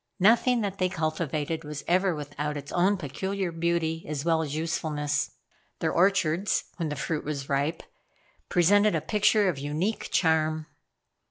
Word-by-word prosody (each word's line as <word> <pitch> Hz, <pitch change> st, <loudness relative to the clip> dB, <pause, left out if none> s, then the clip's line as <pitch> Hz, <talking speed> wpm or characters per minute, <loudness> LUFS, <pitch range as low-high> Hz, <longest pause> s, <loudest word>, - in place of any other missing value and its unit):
Nothing 230 Hz, +5 st, +4 dB
that 200 Hz, -2 st, -3 dB
they 185 Hz, 0 st, +2 dB
cultivated 155 Hz, -1 st, -2 dB
was 150 Hz, -1 st, -6 dB
ever 185 Hz, 0 st, +2 dB
without 150 Hz, 0 st, -4 dB
its 145 Hz, 0 st, -8 dB
own 190 Hz, +3 st, +3 dB
peculiar 190 Hz, +4 st, -3 dB
beauty 165 Hz, -1 st, -1 dB
as 150 Hz, 0 st, -3 dB
well 165 Hz, -1 st, +3 dB
as 150 Hz, -2 st, -3 dB
usefulness. 155 Hz, -2 st, -1 dB, 0.5 s
Their -, -, 0 dB
orchards, 185 Hz, 0 st, +2 dB
when 165 Hz, -3 st, -2 dB
the 150 Hz, -, -3 dB
fruit 150 Hz, +2 st, -2 dB
was 140 Hz, -2 st, -4 dB
ripe, 145 Hz, +4 st, 0 dB, 0.7 s
presented 205 Hz, +4 st, +4 dB
a -, -, 0 dB
picture 210 Hz, -1 st, +3 dB
of 165 Hz, -7 st, -1 dB
unique 155 Hz, +10 st, -2 dB
charm. 160 Hz, -2 st, +2 dB
165 Hz, 150 wpm, -27 LUFS, 150-190 Hz, 0.7 s, Nothing